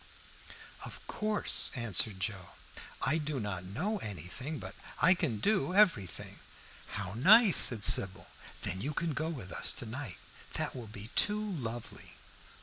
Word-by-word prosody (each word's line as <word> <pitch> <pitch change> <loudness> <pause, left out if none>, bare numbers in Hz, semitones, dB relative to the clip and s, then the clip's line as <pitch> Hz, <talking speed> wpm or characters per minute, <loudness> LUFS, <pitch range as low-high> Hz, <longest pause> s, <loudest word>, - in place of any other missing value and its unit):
"Of - - -11
course," 215 -1 +1
answered 110 -4 0
Joe. 95 -3 -5 0.5
"I 155 +4 0
do 150 -2 -4
not 100 -5 -5
know 180 - -4
anything, 110 - -7
but - - -9 0.3
I 180 - +5
can 160 - -2
do 185 - -1
everything." 165 - 0 0.5
"How 100 -1 -5
nice!" 195 - +6
said 110 -5 +7
Sybil. 95 0 +6 0.4
"Then 95 - -2
you 150 +2 -5
can 165 -3 -2
go 155 +4 -3
with 120 - -8
us - - -2
to - - -4
night. 120 -2 -7 0.4
That - - -4
will 120 -3 -9
be 105 +1 -11
too 210 0 +2
lovely!" 120 - -8
125 Hz, 145 wpm, -30 LUFS, 100-165 Hz, 0.5 s, said